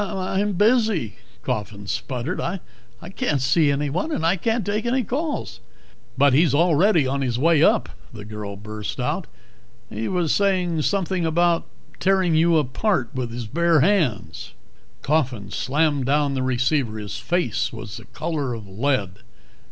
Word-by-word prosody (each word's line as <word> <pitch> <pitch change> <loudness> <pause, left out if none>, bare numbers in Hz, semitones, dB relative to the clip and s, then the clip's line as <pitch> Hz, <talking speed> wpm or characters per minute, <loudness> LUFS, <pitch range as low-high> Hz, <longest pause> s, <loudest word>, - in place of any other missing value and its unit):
"I'm 195 +1 -1
busy," 210 - +2 0.3
Coffin 100 -1 -4
sputtered. 130 - -3
"I 185 +3 -2 0.6
can't 155 - 0
see 145 +4 +3
anyone. 145 - -1
And 160 - -1
I 170 +3 +3
can't 225 +3 -1
take 215 +3 -1
any 255 +1 +1
calls." 290 +8 -3 0.6
"But 140 0 +5
he's 150 0 +4
already 170 +1 +4
on 135 +1 -1
his 125 -3 -1
way 160 +3 +3
up," - - +4 0.2
the 100 - -10
girl 105 -1 -6
burst 105 +3 -6
out. 150 +8 -2 0.6
"He 110 +2 -3
was 175 -4 0
saying 180 -5 +1
something 185 +1 0
about 170 +1 +2 0.3
tearing 190 -3 +2
you 165 +1 +4
apart 150 - 0
with 125 -2 -3
his 120 0 -5
bare 165 +5 +2
hands." 130 - 0 0.5
Coffin 130 -9 0
slammed 145 -1 0
down 145 0 +2
the 130 - -1
receiver. 130 -2 0
His 105 -1 -6
face 175 0 -1
was 115 -1 -8
the 110 - -11
color 140 - -3
of 110 -3 -9
lead. 100 -2 -1
150 Hz, 150 wpm, -23 LUFS, 120-180 Hz, 0.6 s, But